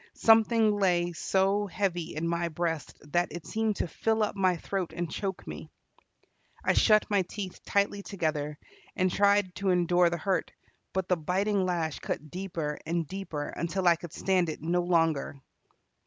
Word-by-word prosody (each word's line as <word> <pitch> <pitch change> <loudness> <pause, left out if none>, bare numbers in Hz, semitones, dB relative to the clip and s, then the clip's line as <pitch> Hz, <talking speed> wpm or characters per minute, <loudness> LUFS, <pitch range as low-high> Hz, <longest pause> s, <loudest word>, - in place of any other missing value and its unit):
Something 225 -1 +5
lay 175 -2 +2
so 195 +4 +1
heavy 180 -3 -2
in 160 +2 -2
my 170 0 0
breast 165 -1 -3 0.2
that 175 0 +2
it 170 +1 -7
seemed 220 -1 0
to - - -2
fill 220 +5 0
up 210 - -1
my 185 -3 +2
throat 185 +1 -3
and 175 0 -2
choke 195 -2 -4
me. - - -8 1.0
I - - +4
shut 215 -1 +5
my 200 -2 +4
teeth 185 +1 -7
tightly 200 0 +1
together, 155 -7 -2 0.4
and 185 -1 +1
tried 200 -1 +3
to 200 -1 0
endure 175 -1 +4
the 170 - -2
hurt, 190 +3 -1 0.4
but 190 -1 -2
the 180 - +2
biting 190 +4 0
lash 165 -4 -1
cut 155 0 -5
deeper 175 -5 -4
and 165 0 -1
deeper 185 -6 -5
until 180 +2 -2
I 170 - +7
could 170 -1 -9
stand 185 -1 +1
it 155 - -5
no 175 +2 +1
longer. 165 -5 +1
180 Hz, 170 wpm, -29 LUFS, 170-195 Hz, 1.0 s, I